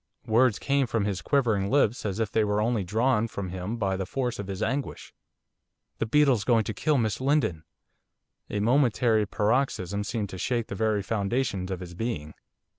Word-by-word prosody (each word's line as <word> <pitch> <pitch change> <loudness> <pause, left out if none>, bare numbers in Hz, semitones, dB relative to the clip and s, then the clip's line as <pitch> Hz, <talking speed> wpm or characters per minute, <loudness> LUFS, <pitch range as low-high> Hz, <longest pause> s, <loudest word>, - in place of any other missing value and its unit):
Words 115 0 +3
came 140 -2 +1
from 115 -3 0
his 100 -4 -2
quivering 110 - +1
lips 125 -5 +2
as 100 +1 -3
if 110 -3 -1
they 110 - +2
were 105 0 0
only 110 -1 +1
drawn 110 +4 +1
from 100 -4 -5
him 95 +5 -4
by 100 -4 0
the 95 -1 -3
force 125 -2 -2
of 100 - -5
his 95 -1 -3
anguish. 140 +1 -3 0.9
'The 115 - -1
beetle's 135 -4 +3
going 115 -1 +3
to 110 - -4
kill 150 +8 +1
Miss 110 -1 -1
Lindon.' 130 - +1 0.9
A 105 - -2
momentary 115 -3 +3
paroxysm 105 -3 0
seemed 105 -1 -3
to 95 - -7
shake 120 +1 -1
the - - -4
very 105 0 0
foundations 100 -1 -1
of 95 -1 -4
his 90 -1 -8
being. 85 -7 -4
110 Hz, 185 wpm, -27 LUFS, 100-125 Hz, 0.9 s, Words